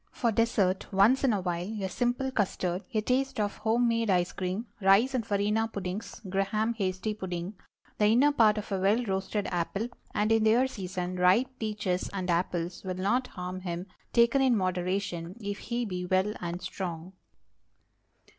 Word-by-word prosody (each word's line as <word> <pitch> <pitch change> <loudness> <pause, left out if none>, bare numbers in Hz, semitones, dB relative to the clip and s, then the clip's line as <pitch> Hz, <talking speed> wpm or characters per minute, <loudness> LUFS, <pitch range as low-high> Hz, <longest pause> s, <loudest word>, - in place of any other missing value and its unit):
For 235 -2 0
dessert, 205 -4 +1
once 210 +8 +4
in 265 - +4
a 205 -3 0
while, 180 +4 -3
a 190 - -1
simple 245 +6 -1
custard, 185 -5 -1
a 220 -3 +1
taste 265 +3 0
of 205 -1 -1
home 230 +2 +2
made 230 -1 +1
ice 180 -2 +2
cream, 185 +5 -3 0.2
rice 195 +7 +5
and 250 -3 0
farina 210 +2 +1
puddings, 200 0 -5
Graham 195 +4 0
hasty 195 0 -2
pudding; 185 -2 -5 0.5
the 210 - +5
inner 250 +7 +5
part 220 -6 +4
of 210 - -5
a 195 - 0
well 205 +6 +3
roasted 195 +1 -1
apple, 195 +6 -2 0.3
and, 210 +1 +2
in 225 -1 +4
their 225 +4 +4
season, 185 -5 -4
ripe 185 +8 +4
peaches 210 -4 -2
and 185 -2 -1
apples, 175 0 -1
will 185 -1 -3
not 235 +8 +1
harm 180 0 -6
him, 175 -1 -4 0.3
taken 235 +3 +4
in 255 -4 +4
moderation, 185 -1 -2
if 205 -2 -4
he 240 0 -2
be 180 -3 -4
well 190 +3 +2
and 175 +1 -5
strong. 180 -1 -5
200 Hz, 170 wpm, -29 LUFS, 185-225 Hz, 0.5 s, rice